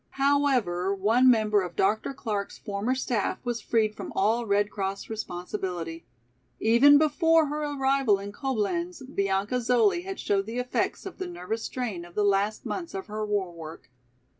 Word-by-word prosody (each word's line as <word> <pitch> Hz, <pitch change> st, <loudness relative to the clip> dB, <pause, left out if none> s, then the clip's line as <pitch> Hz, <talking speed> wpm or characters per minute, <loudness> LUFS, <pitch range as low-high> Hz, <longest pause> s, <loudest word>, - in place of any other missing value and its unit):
However, 255 Hz, -10 st, +2 dB
one 225 Hz, +6 st, +4 dB
member 215 Hz, -3 st, +3 dB
of 175 Hz, -2 st, -6 dB
Dr. 210 Hz, +8 st, +1 dB
Clark's 215 Hz, -7 st, -4 dB
former 205 Hz, +5 st, -2 dB
staff 245 Hz, -5 st, -1 dB
was 240 Hz, -1 st, -2 dB
freed 220 Hz, -2 st, +1 dB
from -, -, -7 dB
all 225 Hz, +4 st, +1 dB
Red 205 Hz, +1 st, +2 dB
Cross 195 Hz, +1 st, -4 dB
responsibility. 175 Hz, -, -5 dB, 0.5 s
Even 250 Hz, +6 st, +6 dB
before 320 Hz, +2 st, +4 dB
her 300 Hz, +1 st, -3 dB
arrival 270 Hz, -6 st, +2 dB
in 200 Hz, +1 st, -7 dB
Coblenz, 270 Hz, -, -2 dB
Bianca 200 Hz, -1 st, -1 dB
Zoli 250 Hz, -, +3 dB
had 385 Hz, 0 st, -6 dB
showed 195 Hz, 0 st, 0 dB
the 230 Hz, +2 st, -5 dB
effects 250 Hz, +9 st, -1 dB
of 385 Hz, -, -8 dB
the 375 Hz, -, -3 dB
nervous 225 Hz, -, -4 dB
strain 220 Hz, -9 st, -4 dB
of 175 Hz, 0 st, -14 dB
the 210 Hz, -, +2 dB
last 205 Hz, +1 st, +1 dB
months 340 Hz, -3 st, -4 dB
of 190 Hz, -, -4 dB
her 215 Hz, 0 st, -4 dB
war 205 Hz, -4 st, -1 dB
work. 160 Hz, -5 st, -10 dB
220 Hz, 165 wpm, -27 LUFS, 200-270 Hz, 0.5 s, Even